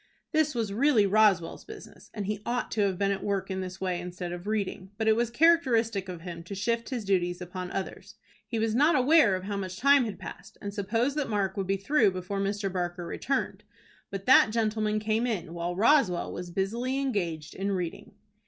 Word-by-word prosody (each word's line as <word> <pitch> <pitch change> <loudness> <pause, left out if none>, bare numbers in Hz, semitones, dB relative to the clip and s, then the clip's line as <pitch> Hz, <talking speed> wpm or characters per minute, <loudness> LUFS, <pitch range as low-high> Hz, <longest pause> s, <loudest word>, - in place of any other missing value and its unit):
This 310 -3 +2
was 220 -4 -1
really 240 -2 +4
Roswell's 200 -4 +3
business, - - -12
and 205 -2 -5
he 210 +1 -3
ought 245 +2 -2
to 220 - 0
have 195 -3 +1
been 200 +1 +1
at 195 - -3
work 200 -1 -2
in 190 0 -2
this 185 0 -6
way 180 -2 -2
instead 180 0 -6
of 175 +2 -7
reading; 200 -3 -2
but 220 0 -1
it 220 - +5
was 235 0 0
characteristic 235 - +3
of 175 -2 -7
him 170 -1 -7
to 200 - -6
shift 230 +4 -1
his 240 -5 -4
duties 175 -2 +1
upon 180 0 -6
others. 190 - -6 0.3
He 230 - -3
was 220 0 0
not 295 +7 +4
aware 275 - +5
of 185 - -5
how 200 +1 -3
much 185 -1 -5
time 280 0 +5
had 210 -4 -5
passed, - - -10
and 200 0 -6
supposed 225 +7 0
that 290 -5 -1
Mark 200 -3 0
would 195 -2 -2
be 195 0 +1
through 220 +2 +3
before 185 +1 -4
Mr. 195 -1 -2
Barker 175 -1 -3
returned. 270 +10 -2 0.5
But 195 -1 -6
that 260 -3 +7
gentleman 215 -1 0
came 220 +3 0
in 180 -8 -3
while 175 +1 -3
Roswell 215 - +3
was 175 0 -6
busily 230 +9 -1
engaged 175 - -2
in 195 +1 -2
reading. 180 +2 -5
200 Hz, 210 wpm, -28 LUFS, 185-230 Hz, 0.5 s, that